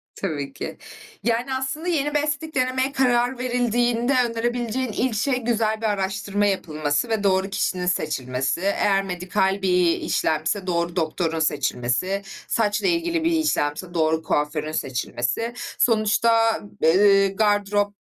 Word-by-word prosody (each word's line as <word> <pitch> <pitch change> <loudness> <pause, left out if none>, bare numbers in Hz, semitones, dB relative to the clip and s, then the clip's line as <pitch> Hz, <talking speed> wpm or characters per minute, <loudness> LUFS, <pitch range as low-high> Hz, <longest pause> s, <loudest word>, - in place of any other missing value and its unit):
Tabii 145 -7 -4
ki. - - -6 0.5
Yani 240 +3 0
aslında 270 +6 -3
yeni 295 -4 0
bir 295 - +3
estetik 305 +1 -3
denemeye 260 +1 +1
karar 245 -1 +1
verildiğinde 245 0 +1
önerebileceğin 240 +1 -2
ilk 240 +1 -1
şey, 250 +4 0
güzel 220 -1 0
bir - - -2
araştırma 205 0 -1
yapılması 155 -3 -1
ve 220 -2 0
doğru 190 0 +2
kişinin 185 -2 -1
seçilmesi 135 -4 -1
eğer 195 0 +2
medikal 190 +1 -1
bir 180 -3 +3
işlemse 160 +5 -1
doğru 170 0 -1
doktorun 165 0 -1
seçilmesi, 145 +5 0 0.3
saçla 215 - +1
ilgili 335 -1 0
bir 335 - +2
işlemse 185 - 0
doğru 160 -1 +1
kuaförün 150 +1 -1
seçilmesi. 135 - -2 0.3
Sonuçta 225 0 +3 0.2
b 160 - +5
eee, 195 +1 +5
gardırop 205 0 +1
205 Hz, 130 wpm, -23 LUFS, 170-240 Hz, 0.5 s, b